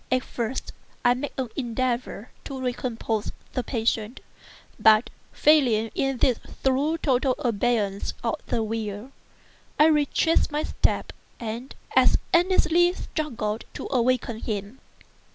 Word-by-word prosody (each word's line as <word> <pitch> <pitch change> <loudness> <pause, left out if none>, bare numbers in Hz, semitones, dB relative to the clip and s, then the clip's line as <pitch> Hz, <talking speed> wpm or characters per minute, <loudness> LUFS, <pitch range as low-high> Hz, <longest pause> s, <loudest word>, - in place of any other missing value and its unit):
At 255 0 +2
first 240 +2 -4 0.3
I 245 - +6
made 265 +4 -4
an 260 -3 -2
endeavor 245 -2 -2
to 270 -1 -6
recompose 240 -4 -2 0.2
the 255 - -1
patient; 225 -1 -1 0.6
but, 220 +1 +5 0.2
failing 245 -8 +3
in 270 -1 0
this 245 -1 +2 0.2
through 275 +5 +2
total 260 -4 +1
abeyance 215 -4 0
of 230 - -1
the 225 - 0
will, 220 +2 -4 0.7
I 300 - +7
retraced 310 +1 +3
my 300 +1 -1
steps - - 0 0.3
and 235 +3 -6 0.2
as - - +6 0.2
earnestly 350 -1 +4
struggled 235 - -3
to - - -5
awaken 245 -3 +1
him. 210 +3 -4
245 Hz, 120 wpm, -25 LUFS, 225-275 Hz, 0.7 s, I